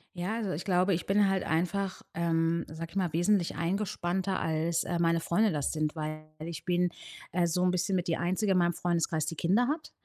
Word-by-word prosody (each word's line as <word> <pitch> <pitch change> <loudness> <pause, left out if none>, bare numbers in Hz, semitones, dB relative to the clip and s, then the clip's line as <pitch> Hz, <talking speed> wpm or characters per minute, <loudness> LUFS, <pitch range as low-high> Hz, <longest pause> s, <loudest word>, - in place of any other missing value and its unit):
Ja. 180 +5 -2
Also, 220 -5 -2
ich 165 - -3
glaube, 185 0 +3
ich 165 - -2
bin 200 0 +4
halt 190 -1 +1
einfach, 185 +4 -1
ähm, 165 0 +1
sage 165 +1 -7
ich - - -16
mal 180 -4 0
wesentlich 175 +2 +2
eingespannter, 185 +1 -1
als, 160 +1 0
äh, 175 -1 -2
meine 170 0 +3
Freunde 205 +6 +2
das 145 -4 -1
sind. 155 0 -1
Weil 155 0 -4 0.2
ich 170 +1 -6
bin, 180 0 +2 0.4
äh, 175 -1 +2
so 180 +2 0
'n 180 - +3
bisschen 185 +2 0
mit 180 0 -1
die 165 - +1
einzige 185 +4 0
in 190 - +4
meinem 175 0 +2
Freundeskreis, 165 -3 0
die 165 - -4
Kinder 200 +11 +2
hat. 305 +2 -3
175 Hz, 215 wpm, -30 LUFS, 165-190 Hz, 0.4 s, bin